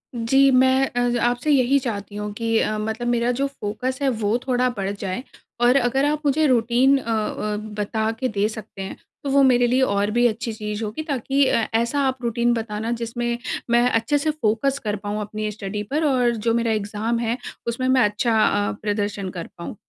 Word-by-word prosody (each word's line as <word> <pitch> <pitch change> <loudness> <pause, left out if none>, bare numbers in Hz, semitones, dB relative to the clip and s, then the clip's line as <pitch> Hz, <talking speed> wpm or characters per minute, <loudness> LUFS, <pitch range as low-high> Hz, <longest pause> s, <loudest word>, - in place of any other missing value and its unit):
जी, 270 +4 +4
मैं 260 +1 +4
अ, 245 0 +1
आपसे 245 +5 +1
यही 270 -1 +4
चाहती 205 -5 -5
हूँ 210 0 -4
कि 225 +1 0
अ, 215 - 0
मतलब 220 +3 -3
मेरा 240 0 +1
जो 265 +3 0
फोकस 255 0 -4
है 275 - +2
वो 220 -2 0
थोड़ा 250 0 +2
बढ़ 195 -1 -2
जाए। 200 +3 -4 0.4
और 245 +2 +5
अगर 265 +2 +2
आप 300 +1 0
मुझे 290 +2 +3
रूटीन 250 +2 +3
अ 265 - -5
अ, 215 -1 -1 0.2
बता 220 +1 -1
के 260 - 0
दे 210 -3 0
सकते 215 -2 -9
हैं, 190 - -6 0.3
तो 280 - -2
वो 275 0 +4
मेरे 245 -2 +4
लिए 255 +2 +2
और 205 -4 +1
भी 240 +2 +2
अच्छी 225 0 -3
चीज़ 210 0 -4
होगी 215 +9 -4
ताकि 275 -1 +1
अ, 230 -3 +1
ऐसा 235 +5 +1
आप 260 0 -1
रूटीन 235 +1 +1
बताना 225 0 -3
जिसमें 235 0 -2 0.3
मैं 240 +1 +4
अच्छे 230 +5 +1
से 310 +2 0
फोकस 270 0 0
कर 210 -2 -1
पाऊँ 205 +1 -3
अपनी 215 +1 -4
स्टडी 210 0 -5
पर 305 +3 +1
और 255 -4 +3
जो 225 +1 0
मेरा 230 -1 +1
एग्ज़ाम 215 +2 -1
है 235 +1 -1 0.3
उसमें 235 +2 -1
मैं 260 0 +4
अच्छा 220 +2 +1
अ, 205 0 +1
प्रदर्शन 205 -2 -2
कर 165 - -6
पाऊँ। 170 - -7
235 Hz, 200 wpm, -22 LUFS, 215-255 Hz, 0.4 s, और